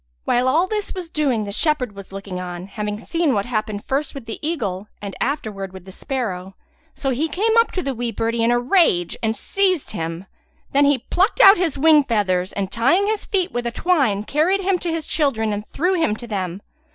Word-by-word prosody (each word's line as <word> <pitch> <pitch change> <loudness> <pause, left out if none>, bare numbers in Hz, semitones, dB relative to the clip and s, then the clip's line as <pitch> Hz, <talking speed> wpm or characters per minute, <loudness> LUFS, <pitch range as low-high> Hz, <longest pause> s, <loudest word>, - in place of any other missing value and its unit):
While 250 +1 +2
all 315 +7 +3
this 420 +1 -3
was 360 -3 -6
doing 270 -8 +1
the 200 - -5
shepherd 265 -1 +1
was 200 -1 -11
looking 195 -1 -6
on, 180 0 -6
having 210 +1 -4
seen 325 +3 0
what 200 -1 0
happened 215 -3 -3
first 285 +3 -2
with 270 -4 -7
the 225 - -6
eagle 215 - -3
and 200 -1 -6
afterwards 215 -9 -3
with 190 -1 -11
the 190 - -10
sparrow; 195 -6 -4 0.4
so 270 - -1
he 285 +6 0
came 425 +8 +1
up 460 - +3
to 365 - -2
the 275 - -2
wee 240 -1 -3
birdie 230 +1 -1
in 230 - +3
a 240 - +3
rage 245 - +2
and 225 -1 0
seized 375 -6 0
him. 165 -1 -4 0.5
Then 285 +1 +4
he 285 -1 +4
plucked 380 +5 +2
out 390 +1 +9
his 340 -5 0
wing 305 +1 +6
feathers 190 -7 0
and, 195 -1 -3
tying 270 - +3
his 430 0 -1
feet 380 -4 0
with 240 0 -2
a - - -2
twine, 260 - +1
carried 325 - +1
him 380 -1 +1
to 345 - -3
his 325 -2 -3
children 230 -9 0
and 205 +1 -5
threw 360 +4 0
him 325 - +1
to 240 - -9
them. 190 -4 -4
245 Hz, 215 wpm, -21 LUFS, 205-325 Hz, 0.5 s, out